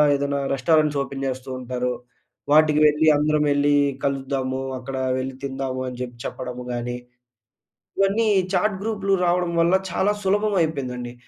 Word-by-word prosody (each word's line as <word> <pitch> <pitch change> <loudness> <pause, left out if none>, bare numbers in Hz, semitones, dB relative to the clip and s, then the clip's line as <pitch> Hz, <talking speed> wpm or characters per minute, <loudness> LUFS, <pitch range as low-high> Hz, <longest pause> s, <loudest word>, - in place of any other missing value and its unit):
ఏదైనా 140 0 -1
restaurants 150 +2 +2
open 135 0 -5
చేస్తూ 130 0 -5
ఉంటారు. 125 0 -2 0.6
వాటికి 155 0 +5
వెళ్లి 150 +1 +2
అందరం 150 0 +2
యెళ్లి 145 0 +3 0.3
కలుద్దాము, 135 -1 -2 0.2
అక్కడ 135 +1 -6 0.2
వెళ్ళి 130 0 -4
తిందాము 135 -1 -3
అని 125 0 -9
చెప్పి 125 -1 -6
చెప్పడము 125 -1 -6
గాని. 120 0 -3 1.0
ఇవన్నీ 205 +3 +2 0.2
చాట్ 195 +2 +1
గ్రూప్‌లు 200 -3 -1
రావడం 175 0 +1
వల్ల 170 +3 +4 0.2
చాలా 200 +4 +1
సులభం 205 +2 +1
అయిపోయిందండి. 125 -6 -3
140 Hz, 135 wpm, -23 LUFS, 130-165 Hz, 1.0 s, వాటికి